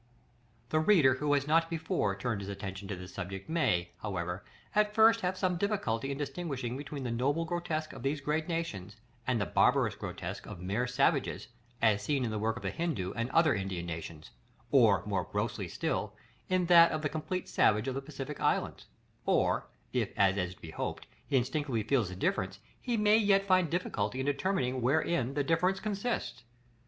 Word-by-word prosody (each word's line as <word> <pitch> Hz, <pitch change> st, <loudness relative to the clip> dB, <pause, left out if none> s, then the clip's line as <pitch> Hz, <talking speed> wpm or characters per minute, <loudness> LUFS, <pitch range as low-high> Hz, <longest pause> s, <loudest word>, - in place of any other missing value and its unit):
§ -, -, -35 dB, 0.6 s
LXX. -, -, -34 dB
The 155 Hz, -, +2 dB
reader 155 Hz, -6 st, +5 dB
who 145 Hz, +3 st, -1 dB
has 140 Hz, -1 st, +2 dB
not 165 Hz, +2 st, +3 dB
before 160 Hz, -, -1 dB
turned 115 Hz, -5 st, -2 dB
his 100 Hz, -, -6 dB
attention 100 Hz, 0 st, -6 dB
to 100 Hz, -, -3 dB
this 90 Hz, 0 st, -10 dB
subject 95 Hz, 0 st, -6 dB
may, 90 Hz, -, +1 dB
however, 90 Hz, -3 st, -3 dB, 0.3 s
at 210 Hz, 0 st, +2 dB
first 225 Hz, +1 st, +6 dB
have 185 Hz, +1 st, -1 dB
some 185 Hz, -2 st, 0 dB
difficulty 140 Hz, -, -1 dB
in 135 Hz, -, -3 dB
distinguishing 140 Hz, -5 st, -3 dB
between 140 Hz, 0 st, -6 dB
the 120 Hz, -, -2 dB
noble 140 Hz, +8 st, 0 dB
grotesque 165 Hz, -2 st, -3 dB
of -, -, -9 dB
these 140 Hz, +3 st, -1 dB
great 150 Hz, +3 st, -1 dB
nations, 165 Hz, -, -3 dB, 0.3 s
and 125 Hz, -3 st, +2 dB
the 100 Hz, -, 0 dB
barbarous -, -, +3 dB
grotesque -, -, -6 dB
of -, -, -8 dB
mere 100 Hz, +8 st, -1 dB
savages, 125 Hz, -, +1 dB, 0.3 s
as 105 Hz, -2 st, +4 dB
seen 140 Hz, -4 st, 0 dB
in 115 Hz, -, -2 dB
the 110 Hz, -, -2 dB
work 110 Hz, +2 st, 0 dB
of -, -, -9 dB
the -, -, -1 dB
Hindoo 160 Hz, -, -2 dB
and 115 Hz, +2 st, -2 dB
other 160 Hz, 0 st, +4 dB
Indian 95 Hz, -4 st, -3 dB
nations; 80 Hz, -3 st, -7 dB, 0.4 s
or, -, -, +5 dB
more -, -, -1 dB
grossly -, -, -2 dB
still, 105 Hz, 0 st, -2 dB, 0.3 s
in 185 Hz, -1 st, +2 dB
that 170 Hz, -1 st, +7 dB
of 155 Hz, -, -2 dB
the -, -, +2 dB
complete 160 Hz, +5 st, -3 dB
savage 105 Hz, +3 st, +3 dB
of 130 Hz, -, -1 dB
the 135 Hz, -, -3 dB
Pacific 140 Hz, 0 st, -7 dB
islands; -, -, 0 dB, 0.4 s
or -, -, +2 dB, 0.3 s
if, -, -, +1 dB
as 95 Hz, -1 st, +4 dB
is 90 Hz, -2 st, -2 dB
to -, -, -26 dB
be 80 Hz, -, -8 dB
hoped, -, -, -4 dB, 0.2 s
he 135 Hz, -, +2 dB
instinctively 130 Hz, -2 st, -1 dB
feels 115 Hz, -4 st, +1 dB
the 90 Hz, -, -7 dB
difference, 95 Hz, +1 st, -1 dB, 0.2 s
he 240 Hz, -2 st, -1 dB
may 210 Hz, 0 st, +5 dB
yet 200 Hz, -2 st, +3 dB
find 185 Hz, -4 st, +3 dB
difficulty 130 Hz, -, -1 dB
in 130 Hz, -, -1 dB
determining 140 Hz, -3 st, 0 dB
wherein 135 Hz, 0 st, +1 dB
that 145 Hz, -1 st, 0 dB
difference 180 Hz, +5 st, +2 dB
consists. 215 Hz, +3 st, -3 dB
135 Hz, 195 wpm, -31 LUFS, 105-170 Hz, 0.6 s, that